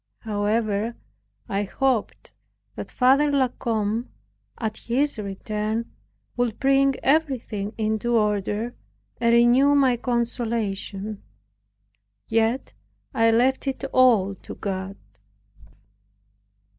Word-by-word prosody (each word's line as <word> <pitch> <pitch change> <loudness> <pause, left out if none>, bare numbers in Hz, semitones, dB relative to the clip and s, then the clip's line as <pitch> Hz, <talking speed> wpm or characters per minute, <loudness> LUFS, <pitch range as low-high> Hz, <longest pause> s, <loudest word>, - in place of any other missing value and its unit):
However, 215 +1 -1 0.5
I 200 0 -1
hoped 245 +3 -1 0.4
that - - -6
Father 275 +3 +4
La 270 -3 +2
Combe, 225 -1 -2 0.5
at 220 -2 -3
his 265 +1 0
return, 215 +3 -3 0.4
would 245 -3 -1
bring 275 0 +3
everything 255 -9 0
into 220 +2 0
order, 210 +2 0 0.5
and 235 0 +3
renew 245 +4 +5
my 260 -4 +4
consolation. 220 -4 -2 1.1
Yet 225 - 0 0.4
I 225 0 +3
left 250 +5 +2
it 270 0 -3
all 225 -7 +4
to - - -10
God. 195 -1 -4
230 Hz, 95 wpm, -24 LUFS, 210-255 Hz, 1.1 s, renew